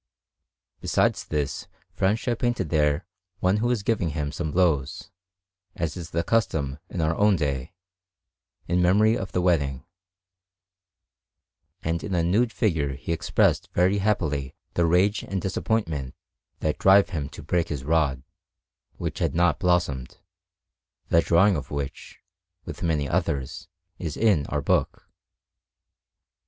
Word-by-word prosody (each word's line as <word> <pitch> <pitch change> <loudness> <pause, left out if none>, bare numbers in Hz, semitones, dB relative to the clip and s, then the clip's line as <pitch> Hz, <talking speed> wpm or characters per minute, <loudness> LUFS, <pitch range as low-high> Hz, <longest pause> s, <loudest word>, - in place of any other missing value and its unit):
Besides - - +1
this, 75 -2 -3 0.3
Francia 110 +5 0
painted 120 -8 -1
there 75 +1 +2 0.3
one 95 +3 +2
who 120 +3 0
is 120 -5 0
giving 100 -6 0
him 75 -1 -2
some 80 0 -3
blows, 80 -6 0 0.6
as 85 -1 -2
is 85 -2 -7
the 85 0 -1
custom 80 -10 0
in 85 - -3
our 80 +1 +1
own 105 +1 +4
day, 70 -5 -2 0.9
in 90 +1 +1
memory 105 +5 +4
of 95 -4 -4
the 90 - 0
wedding; 70 -7 +1 2.0
and 80 +1 -1
in 95 - -2
a 85 - +2
nude 110 +8 +2
figure 80 - 0
he 70 - -6
expressed 85 - +1
very 95 +3 +3
happily 75 -10 -1 0.2
the 85 -1 +2
rage 95 +5 +3
and 95 - -3
disappointment 85 - -2 0.5
that 75 - -1
drive 95 +1 +5
him 75 -6 -3
to - - -11
break 85 -2 0
his 70 -4 -4
rod, 70 -4 +1 0.7
which - - -5
had - - 0
not 85 -2 +2
blossomed, 90 - 0 0.9
the 85 - +5
drawing 90 +4 +4
of 75 - -5
which, 70 -2 -6 0.5
with - - -8
many 75 -4 0
others, 65 -1 -2 0.3
is 80 -5 -4
in 100 -11 +2
our - - -2
book. - - 0
85 Hz, 135 wpm, -25 LUFS, 75-95 Hz, 2.0 s, drive